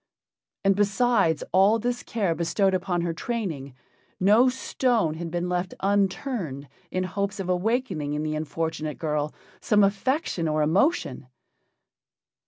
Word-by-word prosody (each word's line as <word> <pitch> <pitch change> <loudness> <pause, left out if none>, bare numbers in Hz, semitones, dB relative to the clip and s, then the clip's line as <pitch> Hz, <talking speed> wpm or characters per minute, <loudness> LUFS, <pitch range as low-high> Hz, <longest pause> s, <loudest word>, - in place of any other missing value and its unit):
And 195 0 +5
besides 200 -4 +2
all 195 +5 +5
this 245 +2 -2
care 200 -7 -1
bestowed 190 +4 +1
upon 180 -1 0
her 170 -1 -1
training, 165 - -4 0.4
no 215 +7 +5
stone 245 -8 0
had 165 +1 -5
been 175 +1 -2
left 180 +1 -2
unturned 195 - -1 0.2
in 185 - -1
hopes 200 +2 -3
of 185 -2 -3
awakening 180 - 0
in 150 - -2
the 155 0 -2
unfortunate 155 0 -3
girl 150 -1 -1 0.3
some 210 -1 +3
affection 200 - 0
or 155 0 +1
emotion. 200 - +1
185 Hz, 130 wpm, -25 LUFS, 160-210 Hz, 0.4 s, And